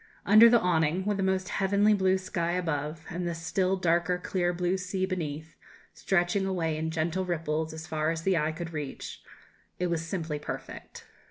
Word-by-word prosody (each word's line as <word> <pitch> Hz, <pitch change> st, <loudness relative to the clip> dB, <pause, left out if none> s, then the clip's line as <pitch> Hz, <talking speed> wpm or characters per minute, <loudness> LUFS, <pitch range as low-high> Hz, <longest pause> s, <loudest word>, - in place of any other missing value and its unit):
Under 215 Hz, +4 st, +8 dB
the 235 Hz, 0 st, +5 dB
awning 175 Hz, 0 st, +1 dB
with 205 Hz, -1 st, 0 dB
the -, -, -1 dB
most 190 Hz, 0 st, 0 dB
heavenly 200 Hz, +2 st, +3 dB
blue 190 Hz, -2 st, +3 dB
sky 175 Hz, -2 st, -2 dB
above, 160 Hz, -2 st, -2 dB
and 175 Hz, +1 st, -3 dB
the 170 Hz, -, -2 dB
still 185 Hz, +3 st, 0 dB
darker 175 Hz, 0 st, +1 dB
clear 180 Hz, -1 st, -1 dB
blue 180 Hz, +1 st, 0 dB
sea 185 Hz, 0 st, -2 dB
beneath, 160 Hz, -4 st, -4 dB, 0.4 s
stretching 190 Hz, +1 st, +1 dB
away 165 Hz, -4 st, -1 dB
in 160 Hz, +1 st, -2 dB
gentle 165 Hz, +3 st, -1 dB
ripples 160 Hz, -3 st, -2 dB
as 160 Hz, 0 st, -7 dB
far 155 Hz, 0 st, -1 dB
as 165 Hz, 0 st, -2 dB
the 190 Hz, 0 st, +2 dB
eye 155 Hz, -1 st, +1 dB
could 165 Hz, +1 st, -6 dB
reach 150 Hz, -3 st, -6 dB, 0.6 s
it 180 Hz, -1 st, -1 dB
was 165 Hz, -1 st, -1 dB
simply 165 Hz, -3 st, -3 dB
perfect. -, -, -8 dB
175 Hz, 180 wpm, -28 LUFS, 160-190 Hz, 0.6 s, Under